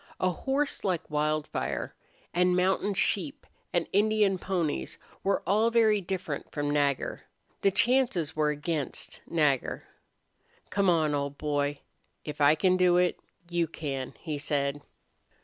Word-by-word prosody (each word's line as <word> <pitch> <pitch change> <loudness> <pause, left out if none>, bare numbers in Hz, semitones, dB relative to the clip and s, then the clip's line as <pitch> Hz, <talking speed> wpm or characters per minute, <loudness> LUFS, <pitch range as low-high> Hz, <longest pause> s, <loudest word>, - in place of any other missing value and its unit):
A 185 - +2
horse 275 - -1
like 180 -5 -1
Wildfire, 150 0 -1 0.4
and 180 +1 +3
mountain 190 +2 +1
sheep 180 -5 0 0.3
and 175 -1 0
Indian 205 -1 +3
ponies, 165 - -2 0.3
were 195 +1 +1
all 210 +6 +3
very 220 -3 +4
different 180 -5 -4
from 145 -1 -1
Nagger. 145 -2 0 0.4
The 195 - +5
chances 235 - +2
were 155 -1 +2
against 150 -1 -3
Nagger. 150 -6 +1 0.9
"Come 200 -1 +2
on, 160 -3 +3
old 140 0 -2
boy. 145 -1 -1 0.4
If 150 -1 -5
I 145 +2 +6
can 185 +2 +3
do 180 -1 +4
it, 180 0 +2 0.3
you 170 -1 0
can," 140 -5 -5
he 155 -4 -4
said. 145 0 -1
170 Hz, 130 wpm, -28 LUFS, 145-190 Hz, 0.9 s, I